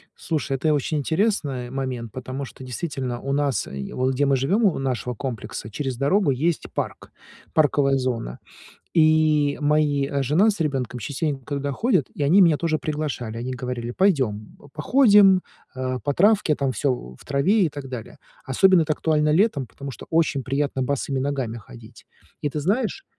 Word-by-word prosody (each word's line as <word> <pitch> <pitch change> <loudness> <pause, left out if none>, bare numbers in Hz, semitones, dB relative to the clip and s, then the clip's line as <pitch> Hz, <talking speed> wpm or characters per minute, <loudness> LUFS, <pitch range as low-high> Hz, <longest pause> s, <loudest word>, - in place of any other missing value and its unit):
Слушай, 155 -3 -3
это 145 - -2
я - - +4
очень 150 +2 -1
интересно 155 - 0
момент, 130 -4 -4
потому 130 +3 -5
что, 130 - -12
действительно, 130 -1 -4
у 140 - -2
нас, 140 -2 0
е 70 0 -6
вот 130 +1 0
где 140 +3 +1
мы 140 -1 +3
живём, 150 - +1
у 190 - +2
нашего 125 -2 -2
комплекса, 115 -3 -5
через 130 +1 -4
дорогу 145 - +2
есть 155 +6 0
парк, - - -5 0.4
парковая 145 -3 +3
зона, 120 - -3 0.6
и 155 -2 +3
мои, 145 -2 +2
э, 140 -1 -1
жена 160 - +3
с 205 - -6
ребёнком 135 -5 -2
частенько 140 +3 -3
туда 140 0 -2
ходят, 185 - +1
и - - -4
они 165 +8 +5
меня 165 -4 +5
тоже 160 -1 0
приглашали. 145 -8 -4
Они 125 +2 -4
говорили: 125 -1 -4
"Пойдём, 130 - 0 0.2
походим, 205 -8 +5 0.3
э, 130 0 -2
по 145 - +1
травке, 195 -2 +3
там 140 -2 -1
всё 140 +1 0 0.3
в - - -16
траве 185 +10 +2
и 165 - +2
так 145 -2 -8
далее". 125 -4 -7 0.3
Особенно 185 +6 +4
это 155 - 0
актуально 150 0 +1
летом, 170 - +2
потому 140 +7 -8
что 130 - -10
очень 160 -4 +1
приятно 135 +1 -1
босыми 135 0 -1
ногами 130 -4 -2
ходить. 110 +1 -14 0.4
И 145 - +1
ты 150 - -3
знаешь, 220 - -1
140 Hz, 175 wpm, -23 LUFS, 130-155 Hz, 0.6 s, они